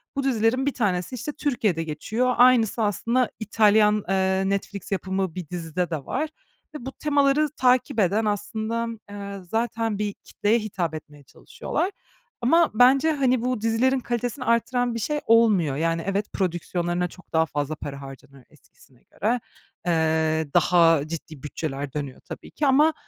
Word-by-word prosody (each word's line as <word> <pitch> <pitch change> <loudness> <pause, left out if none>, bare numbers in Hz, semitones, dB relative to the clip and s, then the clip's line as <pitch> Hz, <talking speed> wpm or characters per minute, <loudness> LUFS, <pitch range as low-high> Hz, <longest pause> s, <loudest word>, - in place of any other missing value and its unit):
bu 275 - -1
dizilerin 255 0 +1
bir 280 - 0
tanesi, 190 -1 -1
işte, 275 +5 -4
Türkiye'de 225 - -1
geçiyor. 220 +11 -1
Aynısı 240 -3 +4
aslında 230 +5 0
İtalyan, 210 -1 +3
eee, 190 0 +1
Netflix 200 0 -4
yapımı 190 -2 -2
bir 180 -4 -6
dizide 175 0 -3
de 155 -5 -4
var 310 0 -2 0.5
ve 255 -4 -7
bu 270 - -4
temaları 290 0 +2
takip 250 -1 +2
eden 205 +3 +2
aslında, 220 +3 -2 0.2
eee, 200 -1 -7
zaten 225 -2 -1
bir 210 -1 -1
kitleye 215 +4 -1
hitap 185 -7 -3
etmeye 150 -2 -11
çalışıyorlar. 370 - -4 0.5
Ama 330 +7 +4
bence, 265 +7 +5
hani, 255 -4 +1
bu 250 -3 -1
dizilerin 245 +4 +2
kalitesini 245 +1 -3
arttıran 240 +1 +1
bir 230 - -2
şey 300 +7 -1
olmuyor. 210 -11 +4
Yani, 165 +2 0
evet, 200 +1 -2
prodüksiyonlarına 175 -1 -1
çok 185 +1 -17
daha 160 0 +4
fazla 150 -1 -3
para 140 -2 -7
harcanıyor 135 -1 -12
eskisine 135 -3 -24
göre. 235 +4 -1 0.5
Eee, 160 -2 +1
daha 165 -4 +4
ciddi 155 -3 -8
bütçeler 145 -2 -5
dönüyor 140 -3 -5
tabii - - -9
ki 295 - 0
ama 300 +4 +5
210 Hz, 150 wpm, -24 LUFS, 165-245 Hz, 0.5 s, bence